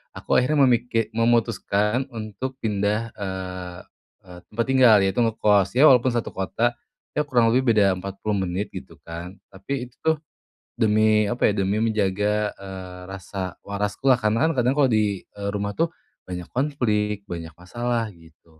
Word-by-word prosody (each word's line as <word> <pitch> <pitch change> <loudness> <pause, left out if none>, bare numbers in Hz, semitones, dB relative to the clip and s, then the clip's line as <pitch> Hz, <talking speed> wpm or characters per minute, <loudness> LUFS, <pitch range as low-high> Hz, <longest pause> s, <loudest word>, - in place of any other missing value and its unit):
aku - - +2
akhirnya 140 +3 +3
memiki 120 -3 +2
memutuskan 115 0 +1
untuk 110 +4 -5
pindah, 105 +1 0
eee 95 -3 -6 0.5
eee, 90 -1 -11
tempat 115 +2 -2
tinggal, 125 -5 +7
yaitu 95 +3 0
ngekos, 105 -3 +2
ya 130 - +5
walaupun 125 -1 +3
satu 120 - -2
kota, 110 +5 0 0.4
ya 150 - 0
kurang 120 -4 +3
lebih 125 -1 +3
beda 100 -3 +3
40 100 +2 -3
menit 95 +4 -3
gitu - - -9
kan, 85 +3 -8 0.2
tapi 125 +7 -5
itu - - -30
tuh, 160 0 +2 0.6
demi 110 0 +3
apa 120 +3 +1
ya, 105 - -2
demi 100 +3 +1
menjaga, 105 -1 0
eee, 95 -2 -9
rasa 95 -2 -6
waraskulah, 105 +6 +1
karena 110 +6 +2
kan 165 - +2
kadang 125 +2 +2
kalau 140 -2 +5
di, 105 -3 0
eee, 100 0 -6
rumah 100 0 -2
tuh 165 +6 +1 0.4
banyak 90 -1 -6
konflik, 105 -7 0
banyak 85 -4 -7
masalah 115 +4 -3
gitu. 80 -2 -21
105 Hz, 155 wpm, -24 LUFS, 95-120 Hz, 0.6 s, tinggal